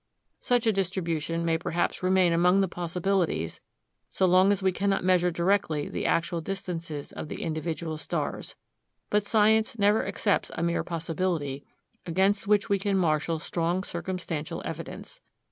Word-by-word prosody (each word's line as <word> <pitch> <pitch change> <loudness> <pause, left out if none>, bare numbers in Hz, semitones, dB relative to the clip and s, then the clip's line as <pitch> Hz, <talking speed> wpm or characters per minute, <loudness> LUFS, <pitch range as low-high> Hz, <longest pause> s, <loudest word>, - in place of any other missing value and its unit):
Such 245 -1 +1
a 220 - +3
distribution 170 -4 -1
may 165 -1 +1
perhaps 170 +1 -1
remain 185 -1 +3
among 180 +3 +4
the 195 - +2
possibilities, 175 - -1 0.5
so 190 - +1
long 185 +2 +5
as 200 -1 0
we 190 - +3
cannot 195 +1 0
measure 180 -1 +3
directly 170 -3 +1
the - - -3
actual 170 0 0
distances 165 -5 -5
of - - -6
the - - -5
individual 160 -1 -3
stars. - - -4 0.6
But 205 -1 +2
science 220 +1 +3
never 205 +1 +3
accepts 205 - 0
a 165 - -2
mere 170 0 0
possibility 165 -4 -2 0.4
against 195 +4 +1
which 205 -1 +3
we 200 -1 +1
can 195 0 +1
marshal 165 -2 +1
strong 170 +3 -1
circumstantial 170 -4 -4
evidence. - - -7
180 Hz, 145 wpm, -27 LUFS, 165-195 Hz, 0.6 s, long